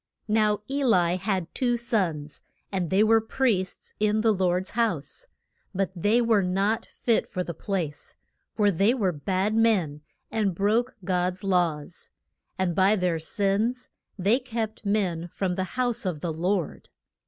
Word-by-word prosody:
Now 210 -1 +2
E 280 +1 -1
li 180 -8 +3
had 185 -3 -2
two 245 -2 +1
sons, 180 - -1 0.3
and 185 -4 -1
they 195 +3 +4
were 225 +1 +5
priests 220 -5 -1
in 215 +1 +2
the 220 -1 +4
Lord's 185 -1 0
house. 220 - -1 0.5
But 195 -1 0
they 205 +7 +2
were 225 -3 +3
not 195 +4 0
fit 230 -2 0
for 180 - -3
the 170 - -5
place, 170 -6 -4 0.4
for 205 -2 +3
they 200 +7 +3
were 200 -8 +1
bad 185 +7 -1
men, 200 -10 +2 0.3
and 205 -5 0
broke 225 +7 +1
God's 180 0 -1
laws. 175 -4 -1 0.5
And 185 -2 0
by 195 +3 +4
their 180 -4 0
sins 205 +8 0 0.3
they 205 +7 +3
kept 225 -4 -4
men 180 -5 0
from 180 +1 -2
the 185 +1 -1
house 245 -1 +1
of 170 -5 -2
the 170 -2 -2
Lord. 175 +1 -2
195 Hz, 155 wpm, -26 LUFS, 180-220 Hz, 0.5 s, were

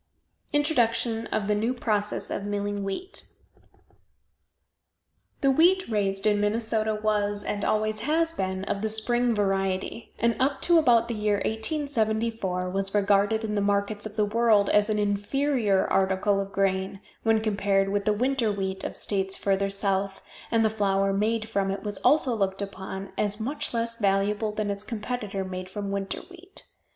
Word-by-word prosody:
INTRODUCTION 235 -6 +1
OF 210 -2 -2
THE 210 - +2
NEW 225 +5 0
PROCESS 210 -4 -1
OF - - -3
MILLING 205 0 -2
WHEAT. 360 - -4 2.1
The 275 - +4
wheat 360 +7 +4
raised 195 -2 0
in 205 -1 +3
Minnesota 220 0 0
was, 205 -1 0
and 205 0 -3
always 215 0 0
has 325 +7 +1
been, 190 -8 -2
of 200 0 -2
the 220 - 0
spring 240 +2 +1
variety, 195 +1 -1
and 235 0 +2
up 275 +1 +1
to 345 -1 +5
about 235 -6 +4
the 235 - -3
year 210 -1 +1
1874 220 - -1
was 195 +1 0
regarded 205 +2 +3
in 215 -1 -2
the 205 - +1
markets 205 +1 0
of 215 - -13
the 210 -1 +2
world 215 -2 +3
as 210 +1 +3
an 215 - +1
inferior 205 +1 +1
article 195 +1 +2
of 195 0 -4
grain, 195 0 0 0.2
when 225 -1 +3
compared 200 -2 +1
with 200 0 -1
the 215 - +3
winter 245 0 +1
wheat 190 -1 -3
of - - -4
states 195 -1 -1
further 195 0 +1
south, 195 -1 -1 0.3
and 225 -1 +3
the 215 - +2
flour 195 -2 +1
made 220 +2 0
from 200 -3 0
it 195 - -3
was 205 -2 -4
also 285 -4 +3
looked 195 -2 -1
upon 190 0 -7
as 210 0 0
much 270 +7 -2
less 230 0 -2
valuable 205 +1 +1
than 210 -1 -2
its 200 0 -5
competitor, 210 -3 -4
made 185 0 -6
from 200 +1 -4
winter 195 0 -3
wheat. 370 +1 -11
210 Hz, 165 wpm, -26 LUFS, 195-230 Hz, 2.1 s, to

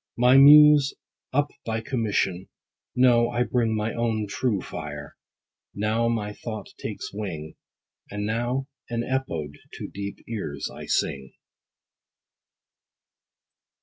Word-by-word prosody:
My 125 +2 +5
muse 145 0 +8 0.4
up 145 +2 +1
by 110 0 -2
commission; 105 -7 -1 0.5
no, 120 -2 +4
I 120 +1 +1
bring 115 -3 0
My 110 +1 -1
own 115 -2 -1
true 105 0 -1
fire: 75 -4 -7 0.6
now 110 +3 0
my 105 -3 -1
thought 110 +1 -7
takes - - -6
wing, 80 -7 -5 0.6
And 105 0 -4
now 120 +5 -1 0.2
an 120 -1 -2
EPODE 80 - -3
to - - -6
deep 100 0 -7
ears 90 -11 -4
I - - -9
sing. 70 -2 -1
110 Hz, 115 wpm, -25 LUFS, 100-125 Hz, 0.6 s, muse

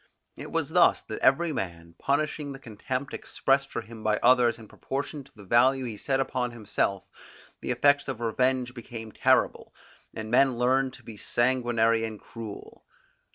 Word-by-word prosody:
It - - -9
was - - -1
thus - - +4
that - - -6
every 155 +5 +3
man, 85 -6 -5
punishing 145 0 -1
the - - -8
contempt 130 +2 -5
expressed 135 0 0
for - - -4
him 115 -1 -11
by 110 0 +1
others 120 -2 +5
in 110 -2 -13
proportion 140 +5 -5
to 135 - -22
the 105 - -13
value 130 +6 +3
he 115 -3 -5
set 135 +6 -1
upon 130 -2 -1
himself, 100 -4 -2 0.6
the - - -6
effects 145 0 +3
of 130 -4 -4
revenge 125 +2 0
became 115 -2 -8
terrible, - - +1 0.4
and 110 0 -6
men 130 0 +4
learned 130 +2 +2
to - - -15
be 110 -2 -10
sanguinary 120 -2 +1
and 110 -2 -5
cruel. 115 -3 -10
125 Hz, 165 wpm, -27 LUFS, 110-135 Hz, 0.6 s, others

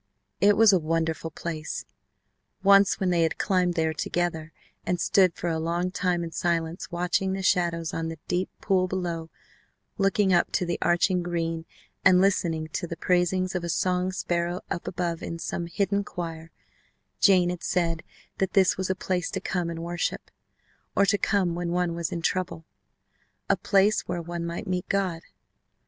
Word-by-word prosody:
It 200 +2 +5
was 220 -2 +7
a 185 - +5
wonderful 165 0 -1
place. 160 0 -5 0.8
Once 200 0 +5
when 185 -2 +1
they 170 -1 +2
had 165 -1 +1
climbed 180 -2 +1
there 160 -1 +1
together 165 0 -2 0.3
and 180 - -1
stood 185 -3 +3
for 175 - -4
a 165 -1 0
long 170 +3 -1
time 180 -2 0
in 165 - -5
silence 165 0 -1
watching 180 +2 0
the 190 0 -3
shadows 170 -3 +1
on 165 0 -2
the 165 0 -5
deep 180 +1 0
pool 185 -2 +2
below, 175 -3 -3 0.7
looking 195 0 +3
up 175 - +3
to 180 - +1
the 175 0 -2
arching 175 +1 +2
green, 165 -2 -2 0.4
and 185 -2 +6
listening 170 -5 +1
to 175 +2 -3
the 170 - -6
praisings 180 +1 +1
of 180 -2 -2
a 170 - -3
song 180 +2 +1
sparrow 175 -1 -1
up 170 - -3
above 170 -2 -2
in 165 - -5
some 170 +1 -4
hidden 200 +3 0
choir, 165 -4 -6 0.7
Jane 180 -3 +5
had 180 - -6
said 165 -2 0 0.4
that 190 -1 0
this 190 -2 +4
was 190 0 -2
a 190 - +1
place 185 -2 -2
to - - -3
come 175 -2 -2
and 165 0 -5
worship 175 0 -3 0.6
or 200 - +5
to 205 +1 +3
come 190 -4 +1
when 175 0 -3
one 175 0 0
was 170 -1 -3
in 170 -1 -4
trouble! 170 -3 -1 0.8
A - - +5
place 200 +1 +2
where 175 - -2
one 170 0 -4
might 170 0 -5
meet 180 -1 -3
God! 185 -4 0
175 Hz, 175 wpm, -26 LUFS, 165-185 Hz, 0.8 s, was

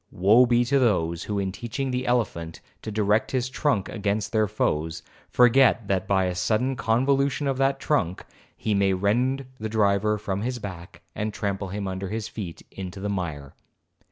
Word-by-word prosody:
Woe 110 +7 +5
be 120 0 +3
to 140 +3 +2
those, 85 -9 +1
who, 105 - -2
in 95 -1 -1
teaching 120 +6 -4
the 125 +1 -2
elephant 95 -10 -1 0.2
to - - -6
direct 105 +1 +1
his 130 -1 -1
trunk 130 -9 0
against 100 -1 -2
their 110 -1 +2
foes, 80 -5 -1 0.3
forget 125 -3 +4
that 95 -1 0
by 95 -1 +2
a 90 - -1
sudden 110 +9 0
convolution 135 +4 +1
of 135 -1 -1
that 135 0 +2
trunk, 95 - -1 0.3
he 110 - -1
may 100 -1 +3
rend 125 +8 +1
the 110 0 -3
driver 105 0 +2
from 100 -1 -3
his 125 +2 -2
back, 90 -6 -9
and 105 0 -3
trample 100 -1 -2
him 100 +1 -4
under 95 0 -4
his 110 0 -3
feet 95 -7 -7
into 95 0 -7
the 105 +1 -3
mire. 80 -8 -4
105 Hz, 180 wpm, -25 LUFS, 95-120 Hz, 0.3 s, Woe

